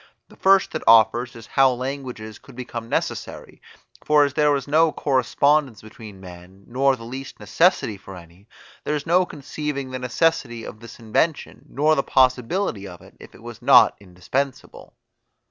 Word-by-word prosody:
The - - -17
first 195 0 +3
that 155 - -4
offers 115 +2 +4
is 115 -1 -11
how 135 +4 +3
languages 125 -4 -6
could 135 - -17
become 120 -2 -7
necessary; - - -4 0.4
for 150 -1 +4
as 140 - -4
there 150 0 +2
was 140 -2 -1
no 160 +2 +3
correspondence 140 -2 0
between 110 -2 -12
men, 90 +1 -14
nor 135 +2 +1
the 115 - -13
least 130 +4 -9
necessity 165 - +1
for 95 0 -12
any, 85 +3 -16 0.4
there 150 - -2
is 145 - -5
no 180 +2 +2
conceiving 145 -2 -6
the 130 - -5
necessity 125 -3 -1
of 110 - -10
this 115 0 -12
invention, 130 +8 -2
nor 150 +3 +2
the 140 - +1
possibility 130 - 0
of 90 -2 -12
it, - - -18
if - - -15
it - - -17
was - - -10
not - - +6
indispensable. 100 +9 -5
130 Hz, 165 wpm, -22 LUFS, 110-145 Hz, 0.4 s, not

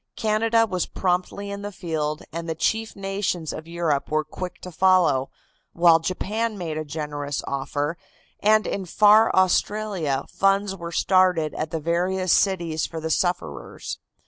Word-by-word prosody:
Canada 225 +1 +2
was 185 -5 -2
promptly 185 +2 -2
in 200 0 -5
the 205 0 -5
field, 160 -5 -3
and 165 0 -5
the 160 - -1
chief 220 +8 -1
nations 195 -4 -2
of 155 - -8
Europe 165 -4 -1
were 155 0 +1
quick 180 +4 -7
to 180 - -8
follow, 175 -7 +3 0.4
while 170 -1 +5
Japan 210 +6 -2
made 165 -4 -4
a 155 - -2
generous 145 -1 -4
offer, 145 +3 -2 0.4
and 215 +1 +4
in 195 - -2
far 210 +4 +5
Australia 185 -5 +1
funds 195 0 +1
were 170 -2 -7
started 180 -4 +3
at 155 - -3
the 160 - -3
various 180 +3 +1
cities 170 -5 +1
for 165 - -6
the 160 0 -3
sufferers. 85 - -2
175 Hz, 150 wpm, -24 LUFS, 155-195 Hz, 0.4 s, while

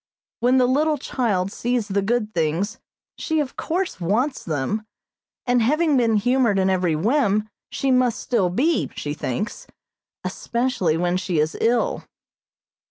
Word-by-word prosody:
When 250 +2 +3
the 255 - +5
little 300 +4 +2
child 205 -8 -1
sees 240 -2 -1
the 200 -1 0
good 215 +1 -1
things, 170 +7 -1 0.4
she, 320 -1 0
of 285 -3 -2
course, 355 - -2
wants 230 - 0
them, 170 +8 -2 0.6
and 245 -1 +3
having 305 +6 +2
been 230 -3 +3
humored 240 -1 +2
in 190 0 +2
every 180 -4 +1
whim, 215 - +1 0.2
she 270 - -1
must 250 -2 +2
still 210 -8 +1
be, 285 - +1
she 145 - -4
thinks, 185 - -4 0.6
especially 235 -10 -1
when 175 +1 +1
she 185 -2 -2
is 155 +1 +1
ill. 235 +1 +1
225 Hz, 145 wpm, -22 LUFS, 185-255 Hz, 0.6 s, the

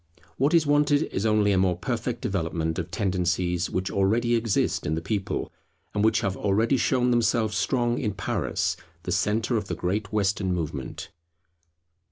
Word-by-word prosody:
What 145 +6 +3
is 165 -2 +4
wanted 145 0 +3
is 100 +4 0
only 105 -1 +3
a 95 - +3
more 90 -2 +2
perfect 120 +5 -3
development 80 -3 -2
of 85 0 -4
tendencies 90 -1 0
which 95 +1 -2
already 110 +5 +2
exist 115 -9 +1
in 75 - 0
the - - -1
people, 100 +3 -3 0.4
and 105 - 0
which 110 0 +3
have 95 -3 -1
already 105 +6 +2
shown 125 -1 +2
themselves 115 -2 +2
strong 120 -2 +1
in 105 -6 -2
Paris, - - -1 0.3
the 90 - -4
centre 110 +6 +1
of 105 -2 -3
the - - -3
great 95 +3 -2
Western 100 -3 0
movement. 75 -6 -5
105 Hz, 165 wpm, -26 LUFS, 90-115 Hz, 0.4 s, is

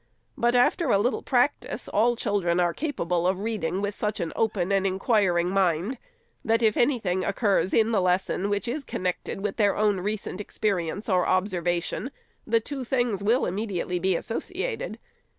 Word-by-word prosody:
But 240 +1 +1
after 285 +8 +3
a - - +5
little 235 +6 0
practice, 255 +3 0
all 235 +4 +2
chil 205 -3 -1
dren 170 0 +1
are 175 -1 +2
capable 180 - -1
of 190 +1 0
reading 195 -5 -2
with 205 0 -1
such 210 +1 -2
an 165 - -3
open 200 -4 0
and 195 0 +2
inquiring 190 -3 +2
mind, 190 +5 +1 0.4
that 225 +1 +2
if 215 -1 +3
any 250 +2 +3
thing 185 -4 -1
occurs 200 -2 +1
in 225 0 +3
the 210 -4 +2
lesson, 185 +2 0
which 205 +3 -1
is 275 +5 -3
connected 185 -3 -3
with 205 -1 -3
their 205 -3 +3
own 210 -2 +2
recent 205 0 -3
experience 200 -2 -2
or 185 -4 +2
observation, 180 +3 0 0.4
the 230 0 +3
two 270 +4 -6
things 240 -5 0
will 230 +6 +2
be - - +1
immediately 185 -2 -2
associ 190 - -2
ated. - - -5
205 Hz, 175 wpm, -26 LUFS, 185-230 Hz, 0.4 s, a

